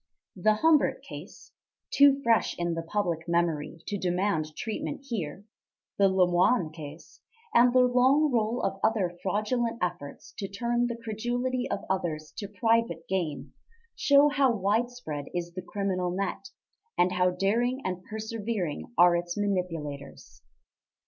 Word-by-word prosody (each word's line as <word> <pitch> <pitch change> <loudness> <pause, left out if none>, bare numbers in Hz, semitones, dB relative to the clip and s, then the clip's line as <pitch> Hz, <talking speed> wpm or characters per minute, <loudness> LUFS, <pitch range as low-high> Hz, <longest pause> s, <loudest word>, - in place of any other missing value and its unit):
The 215 +3 +3
Humbert 310 +5 +3
case - - -11 0.4
too 280 0 +5
fresh 230 -1 +2
in 175 -1 -1
the 165 - -2
public 165 -2 -2
memory 165 -2 -1
to 205 - -3
demand 175 -4 -1
treatment 230 +4 -4
here 200 - -4 0.5
the 195 -1 +5
Lemoine 180 +1 +3
case, 155 0 -11 0.3
and 245 +1 +6
the 255 +1 +5
long 260 +4 +4
roll 230 0 0
of 195 0 -1
other 205 -6 +1
fraudulent 225 +4 -1
efforts 175 -6 -5
to 195 - -3
turn 240 +4 0
the 235 - -3
credulity 245 +3 -2
of 200 - -3
others 160 -5 -3
to 200 - -4
private 225 -2 0
gain, 180 -6 -3 0.4
show 285 +1 +5
how 280 -3 +3
widespread 205 -7 -1
is 175 -1 -3
the 185 - -5
criminal 185 -1 -2
net, 195 +3 -3 0.5
and 180 +1 +3
how 180 0 +2
daring 230 +8 0
and 185 0 -3
persevering 220 -5 -4
are 175 0 +6
its 175 +1 -3
manipulators. 165 -8 -4
200 Hz, 135 wpm, -28 LUFS, 175-235 Hz, 0.5 s, and